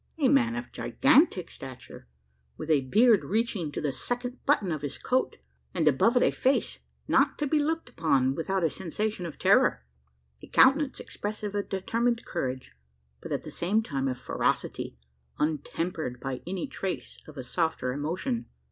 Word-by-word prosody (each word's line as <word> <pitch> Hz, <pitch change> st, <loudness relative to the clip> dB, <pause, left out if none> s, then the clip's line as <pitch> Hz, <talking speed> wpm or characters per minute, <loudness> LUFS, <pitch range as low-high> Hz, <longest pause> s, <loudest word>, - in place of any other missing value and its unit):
A 290 Hz, -4 st, +3 dB
man 240 Hz, -4 st, +3 dB
of 240 Hz, 0 st, -5 dB
gigantic 275 Hz, -, +3 dB
stature, 130 Hz, -, -10 dB, 0.5 s
with 160 Hz, -, -3 dB
a 145 Hz, -3 st, +4 dB
beard 220 Hz, -, +5 dB
reaching 215 Hz, -7 st, -1 dB
to -, -, -4 dB
the 150 Hz, -2 st, -1 dB
second 245 Hz, -, -4 dB
button 215 Hz, -, +3 dB
of 155 Hz, -3 st, -2 dB
his 145 Hz, -2 st, -4 dB
coat; 255 Hz, +1 st, 0 dB, 0.4 s
and 165 Hz, -4 st, +1 dB
above 185 Hz, -, +4 dB
it -, -, +4 dB
a -, -, +4 dB
face, 265 Hz, +2 st, +1 dB, 0.3 s
not -, -, +3 dB
to 295 Hz, -, -1 dB
be 300 Hz, +2 st, +2 dB
looked 320 Hz, +2 st, -1 dB
upon 135 Hz, -, +2 dB
without 185 Hz, +5 st, -1 dB
a 165 Hz, -, +3 dB
sensation 190 Hz, +1 st, -3 dB
of 160 Hz, -, -9 dB
terror: -, -, +3 dB, 0.6 s
a -, -, -11 dB
countenance 275 Hz, +1 st, +4 dB
expressive 210 Hz, 0 st, -5 dB
of 205 Hz, -1 st, -2 dB
determined 230 Hz, +5 st, 0 dB
courage, 130 Hz, -, -4 dB, 0.5 s
but, -, -, -8 dB
at -, -, -1 dB
the -, -, -8 dB
same 205 Hz, +6 st, +1 dB
time, 135 Hz, -8 st, -2 dB
of 130 Hz, -1 st, -2 dB
ferocity, 65 Hz, -, -2 dB, 0.4 s
untempered 155 Hz, -2 st, -2 dB
by 135 Hz, -2 st, -4 dB
any 185 Hz, -1 st, -2 dB
trace 190 Hz, -1 st, -5 dB
of 155 Hz, -1 st, -12 dB
a 130 Hz, -, -4 dB
softer 145 Hz, -2 st, -1 dB
emotion. 185 Hz, -, -2 dB
185 Hz, 165 wpm, -28 LUFS, 150-240 Hz, 0.6 s, beard